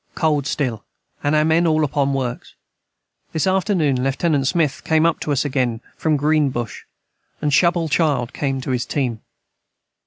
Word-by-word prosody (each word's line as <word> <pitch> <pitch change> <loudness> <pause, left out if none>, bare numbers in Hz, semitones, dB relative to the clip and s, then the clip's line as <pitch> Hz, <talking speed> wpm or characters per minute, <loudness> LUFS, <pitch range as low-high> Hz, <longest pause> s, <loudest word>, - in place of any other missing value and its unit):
Cold 150 -4 +1
stil 125 -8 -2 0.2
& - - -36
our 150 +1 +2
men 165 +2 +3
all 155 -1 +2
upon 140 -1 0
works 125 -3 -4 0.8
this 160 - 0
afternoon 180 -9 +1
Lieut. 135 +1 +1
Smith 155 -4 0
came 160 0 +2
up 165 -1 +2
to 150 - -3
us 140 0 +1
again 125 -5 0 0.2
from 155 -2 +1
Green 150 0 +2
Bush, 120 -3 -5 0.3
& - - -46
Shubal 165 +3 +3
child 140 -6 +1
came 135 -2 -2
to 130 - -4
his 125 -1 -1
team. 125 -6 -2
145 Hz, 160 wpm, -20 LUFS, 130-160 Hz, 0.8 s, men